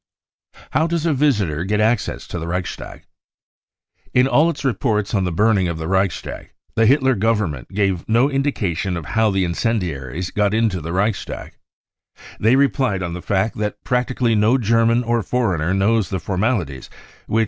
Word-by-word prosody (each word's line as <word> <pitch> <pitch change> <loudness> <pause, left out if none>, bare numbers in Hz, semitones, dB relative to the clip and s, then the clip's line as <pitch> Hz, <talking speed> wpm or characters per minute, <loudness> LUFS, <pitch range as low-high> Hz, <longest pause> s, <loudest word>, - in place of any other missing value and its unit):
How 160 - +2
does 170 -1 -1
a 165 - +2
visitor 105 - +1
get 105 +3 0
access 110 +1 0
to 85 - -4
the 80 - -5
Reichstag? 90 +1 -5 1.1
In 125 +1 +5
all 155 +4 +4
its 165 - -5
reports 110 -5 0
on 95 -3 +1
the 90 - -1
burning 100 +1 +2
of 85 -1 -3
the 80 0 -5
Reichstag, 95 0 -2 0.2
the 115 -1 +3
Hitler 130 +1 +4
Government 105 - -1
gave 95 -3 -1
no 120 +4 +4
indication 105 - -1
of 80 - -6
how 110 +5 +1
the 95 -2 +1
incendiaries 85 - -2
got 105 0 +1
into 110 -6 +1
the 80 +2 -5
Reichstag. 100 +3 -2 0.8
They 115 +4 +4
relied 130 -8 +1
on 85 -1 -4
the 90 - -6
fact 100 +4 -1
that 105 -1 -3
prac 125 0 0
tically 120 -3 0
no 110 +5 +3
German 115 +1 +2
or 120 0 +1
foreigner 95 -9 0
knows 100 0 +2
the 95 - -2
formalities 95 - -2 0.4
which 110 - +1
105 Hz, 170 wpm, -20 LUFS, 90-120 Hz, 1.1 s, In